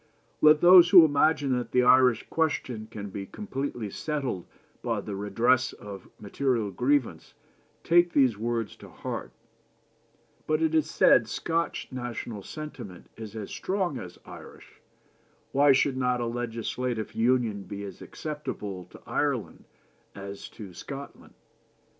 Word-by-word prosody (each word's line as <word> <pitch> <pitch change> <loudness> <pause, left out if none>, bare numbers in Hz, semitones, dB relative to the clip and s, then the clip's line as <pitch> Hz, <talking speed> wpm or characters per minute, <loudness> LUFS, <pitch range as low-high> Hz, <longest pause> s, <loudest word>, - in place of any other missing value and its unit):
" - - -39
Let 150 0 +6
those 175 0 +8
who 180 -3 +9
imagine 145 -2 +2
that 120 - -7
the 125 - +4
Irish 125 -1 +5
question 130 -8 -1
can 100 -2 -7
be 100 0 -6
completely 135 - -5
settled 135 - -3 0.3
by - - -1
the 100 - -6
redress 115 +6 +1
of 100 -2 -10
material 115 0 -1
grievances 130 +6 -1 0.5
take 175 +1 +4
those 130 -6 +4
words 115 +1 -3
to - - -13
heart. - - -6 1.2
But, 155 +1 +1
it 160 0 +1
is 155 -1 +2
said, 120 -6 +4
Scotch 165 +9 -2
national 120 -4 -5
sentiment 120 - -9
is 110 -1 -9
as 105 -3 -6
strong 185 -8 -2
as 90 -1 -9
Irish, - - -13 0.7
why 140 +1 +5
should 135 0 +2
not 125 -1 +1
a 120 - -1
legislative 115 0 -3
union 115 -4 +1
be 100 -1 -7
as 100 - -9
acceptable 105 - -6
to - - -16
Ireland - - -2 0.5
as 100 0 -8
to 100 -4 -11
Scotland? 140 +9 -9
125 Hz, 135 wpm, -27 LUFS, 105-145 Hz, 1.2 s, who